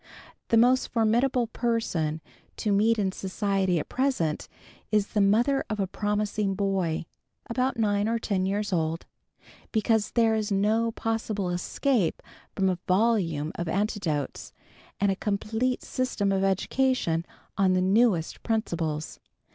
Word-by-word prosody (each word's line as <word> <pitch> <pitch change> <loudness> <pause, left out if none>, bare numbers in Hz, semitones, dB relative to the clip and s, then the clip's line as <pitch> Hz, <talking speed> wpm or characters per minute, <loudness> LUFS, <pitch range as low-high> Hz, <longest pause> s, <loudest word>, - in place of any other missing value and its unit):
The 230 - +3
most 250 +3 +4
formidable 240 +2 +2
person 220 -10 -1 0.4
to 210 - -1
meet 220 +3 +3
in 195 -3 +1
society 190 -1 0
at 150 - -3
present, 255 - -1 0.4
is 210 -2 +2
the 210 - +1
mother 235 +8 +3
of 215 -1 -3
a 195 - +2
promising 205 0 -1
boy, 190 -5 -1 0.4
about 255 +2 -1
nine 205 -1 +1
or 230 - +1
ten 195 -4 -1
years 205 0 -1
old; 165 -1 -1 0.7
because 220 -1 +1
there 230 -2 +3
is 215 -1 -1
no 215 +4 +2
possible 220 -4 -2
escape 190 - 0 0.3
from 190 -1 +1
a 180 -2 0
volume 185 -7 +1
of 175 - -4
anecdotes, 185 - -2 0.5
and 200 0 +3
a - - 0
complete 220 +5 -1
system 255 -6 -1
of 195 0 +1
education 195 -2 +1 0.3
on 190 -1 +3
the 185 - +2
newest 190 -3 +2
principles. 165 -9 -2
205 Hz, 135 wpm, -27 LUFS, 185-225 Hz, 0.7 s, most